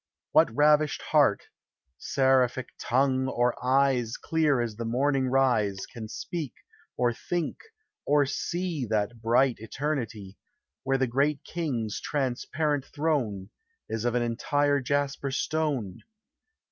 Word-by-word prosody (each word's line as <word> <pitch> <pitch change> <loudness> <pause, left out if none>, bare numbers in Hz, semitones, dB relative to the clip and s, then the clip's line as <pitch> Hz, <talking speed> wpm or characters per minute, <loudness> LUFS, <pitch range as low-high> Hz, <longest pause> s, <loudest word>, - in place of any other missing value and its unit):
What - - +5
ravished 150 +1 +3
heart, - - +4 0.6
seraphic 130 -2 +2
tongue, 130 +1 +1
or 120 -2 +1
eyes 130 -3 +2
Clear 155 -5 +1
as 115 -3 -2
the 115 - -3
morning 130 +3 +1
rise, 120 -7 +1
Can 115 -3 -7
speak, 150 +4 -5 0.4
or 120 -1 +2
think, 170 +6 -3 0.5
or 145 0 +3
see 170 +2 -2
That 110 +2 -1
bright 120 +2 +3
eternity. 115 -5 -4 0.4
Where 135 0 +1
the 130 - +2
great 140 +4 0
King's 125 -11 -3
transparent 145 +1 -1
throne 130 -11 -2 0.4
Is 110 0 -3
of 120 0 0
an 120 - +2
entire 145 +5 +1
jasper 140 +1 -1
stone? 135 -8 -1
130 Hz, 120 wpm, -27 LUFS, 120-145 Hz, 0.6 s, What